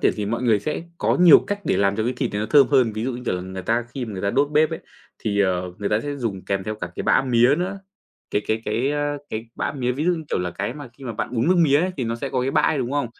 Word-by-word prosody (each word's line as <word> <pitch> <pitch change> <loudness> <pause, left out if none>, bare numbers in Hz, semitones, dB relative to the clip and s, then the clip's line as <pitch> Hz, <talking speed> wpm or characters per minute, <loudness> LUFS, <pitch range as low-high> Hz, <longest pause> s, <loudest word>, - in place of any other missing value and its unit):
triển - - +3
thì 105 - -2
mọi 115 +4 -2
người 115 -4 +3
sẽ 155 - -3 0.2
có - - +1
nhiều 175 -4 +9
cách 205 0 -2
để - - +1
làm 100 0 +2
cho 110 - 0
cái 125 - 0
thịt 130 -2 -2
này 105 - -2
nó 110 - -2
thơm 140 0 +6
hơn. 130 -6 +3
Ví 110 +2 -3
dụ 130 - -1
như, 125 +1 -7
kiểu - - 0
là, 90 - -3
người 95 0 -7
ta 115 +4 0
khi 130 -3 -3
mà 110 - -7
người 95 - -6
ta 100 - +1
đốt 140 +4 +1
bếp 150 +1 +3
ấy, - - -4 0.4
thì, 100 -2 -1
ờ, 90 -2 0
người 100 - -2
ta 105 +1 +1
sẽ 145 +1 -4
dùng 110 -8 -4
kèm 100 -1 -1
theo 110 +2 -3
cả - - -5
cái - - -3
bã - - +3
mía 125 +1 +4
nữa. 190 +3 -3 0.5
Cái 105 - 0
cái 110 +1 -1
cái, 115 +6 0
a, 145 0 -1
cái 110 +1 -4
bã - - -2
mía, 125 -3 -1
ví 145 +5 -3
dụ 180 - +3
như 160 -2 -6
kiểu - - +1
là 90 0 -2
cái 100 +8 -4
mà 145 -3 -9
khi 135 - -11
mà 120 - -4
bạn 115 - -4
uống 120 +9 +1
nước 185 - +4
mía 150 -3 +4
ấy 185 - 0
thì 130 - -2
nó 115 - -2
sẽ 135 - -4
có 130 - -1
cái 130 +2 0
bã - - +3
ấy, 155 - +2
đúng 130 +1 -2
không? 145 -4 0
120 Hz, 335 wpm, -23 LUFS, 105-145 Hz, 0.5 s, nhiều